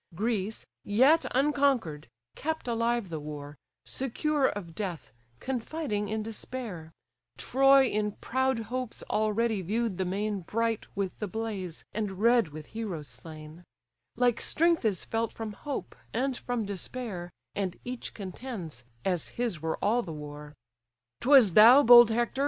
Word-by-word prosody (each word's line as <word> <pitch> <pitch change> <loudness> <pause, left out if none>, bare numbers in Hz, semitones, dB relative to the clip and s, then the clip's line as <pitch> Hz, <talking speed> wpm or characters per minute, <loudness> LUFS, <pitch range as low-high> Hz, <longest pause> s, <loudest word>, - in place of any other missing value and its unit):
Greece, 215 +1 -2 0.2
yet 260 +11 +4
unconquer'd, 270 - +1 0.3
kept 315 -2 -3
alive 235 -3 0
the 160 -2 -4
war, 145 -1 -7 0.3
Secure 275 +2 0
of 175 -5 -5
death, 180 -4 -5 0.3
confiding 255 -4 -3
in 215 0 -2
despair: 220 -7 -7 0.5
Troy 270 +1 +5
in 210 -3 -1
proud 260 +2 0 0.2
hopes 255 -3 -4
already 215 0 +1
view'd 210 +1 -1
the 190 - +1
main 200 +3 -1
Bright 225 +5 -1
with 195 -2 -2
the 210 - -2
blaze, 200 -5 -5
and 210 -2 -2
red 230 +2 +3
with 155 0 -9
heroes 185 -10 -5
slain: 155 +1 -10 0.5
Like 245 -1 +2
strength 335 -4 +2
is 200 -5 0
felt 225 0 -1
from 220 -2 -6
hope, 285 +6 -6 0.2
and 260 +2 0
from 240 -3 -3
despair, 200 -2 -5 0.2
And 190 -3 -3
each 250 0 -6
contends, 185 - -7 0.2
as 180 -4 0
his 230 -10 -2
were 160 0 -2
all 230 +4 +3
the 180 - -7
war. 150 0 -9 0.6
'Twas 255 -8 +6
thou, 240 - +9
bold 240 -1 +9
Hector! 240 +3 -1
220 Hz, 140 wpm, -29 LUFS, 185-245 Hz, 0.6 s, thou